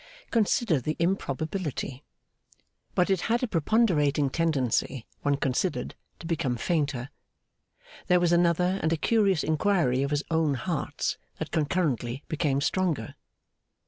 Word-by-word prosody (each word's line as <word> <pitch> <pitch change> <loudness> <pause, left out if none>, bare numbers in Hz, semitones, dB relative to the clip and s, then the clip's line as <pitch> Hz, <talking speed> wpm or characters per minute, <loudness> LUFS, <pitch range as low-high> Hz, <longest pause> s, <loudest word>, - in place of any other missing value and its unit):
Consider 215 - +2
the 155 +5 -2
improbability. 155 -5 -2 0.9
But 180 +2 +2
it 190 -3 +2
had 235 +2 +2
a - - +2
preponderating 160 - +2
tendency, 135 -6 0 0.2
when 145 0 +2
considered, 140 +7 -1 0.2
to - - -11
become 160 -7 -1
fainter. 145 -3 -1 1.0
There 180 -1 +5
was 175 -1 +2
another 175 +2 +3
and 160 - +1
a 165 - +2
curious 200 -3 +2
inquiry 155 -5 +2
of 140 - 0
his 145 +1 0
own 160 -3 +2
heart's 145 +1 -2 0.2
that 160 - -5
concurrently 145 -6 -1
became 145 -3 0
stronger. 160 - 0
160 Hz, 125 wpm, -27 LUFS, 140-180 Hz, 1.0 s, There